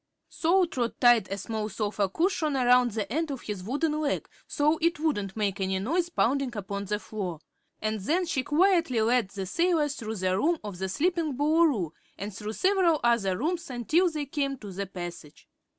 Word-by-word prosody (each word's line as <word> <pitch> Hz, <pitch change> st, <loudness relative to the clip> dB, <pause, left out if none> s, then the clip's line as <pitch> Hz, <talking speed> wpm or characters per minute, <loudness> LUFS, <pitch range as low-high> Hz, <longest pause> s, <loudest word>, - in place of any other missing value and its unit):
So 355 Hz, +3 st, +3 dB
Trot 245 Hz, -8 st, -3 dB
tied 240 Hz, -5 st, +5 dB
a 195 Hz, -, -2 dB
small 215 Hz, +2 st, -3 dB
sofa 205 Hz, -2 st, -1 dB
cushion 320 Hz, -, 0 dB
around 250 Hz, -1 st, +5 dB
the 215 Hz, 0 st, -4 dB
end 320 Hz, +1 st, 0 dB
of 270 Hz, -3 st, -5 dB
his 205 Hz, -4 st, -5 dB
wooden 300 Hz, -, -1 dB
leg, 290 Hz, -2 st, -1 dB, 0.2 s
so 300 Hz, +2 st, +1 dB
it 335 Hz, -1 st, +1 dB
wouldn't 205 Hz, -, -1 dB
make 200 Hz, -2 st, -1 dB
any 190 Hz, 0 st, 0 dB
noise 335 Hz, -, 0 dB
pounding 275 Hz, -4 st, +1 dB
upon 200 Hz, 0 st, -4 dB
the 210 Hz, +1 st, -1 dB
floor, 195 Hz, -6 st, -5 dB, 0.4 s
and 215 Hz, 0 st, -1 dB
then 330 Hz, -, 0 dB
she 315 Hz, -6 st, 0 dB
quietly 330 Hz, -, +2 dB
led 230 Hz, -2 st, +2 dB
the 195 Hz, -1 st, -5 dB
sailor 330 Hz, -, +1 dB
through 225 Hz, -6 st, -5 dB
the 185 Hz, -2 st, 0 dB
room 325 Hz, -, +2 dB
of 200 Hz, -4 st, -7 dB
the 190 Hz, 0 st, -2 dB
sleeping 320 Hz, -, 0 dB
Boolooroo 295 Hz, -, +2 dB, 0.3 s
and 200 Hz, 0 st, -6 dB
through 215 Hz, +1 st, -5 dB
several 370 Hz, -, +3 dB
other 220 Hz, -6 st, +2 dB
rooms 330 Hz, +6 st, -2 dB
until 305 Hz, -, +2 dB
they 305 Hz, -3 st, -3 dB
came 275 Hz, -1 st, -2 dB
to 205 Hz, -5 st, -9 dB
the 195 Hz, +1 st, -4 dB
passage. 175 Hz, -5 st, -8 dB
245 Hz, 185 wpm, -27 LUFS, 200-315 Hz, 0.4 s, tied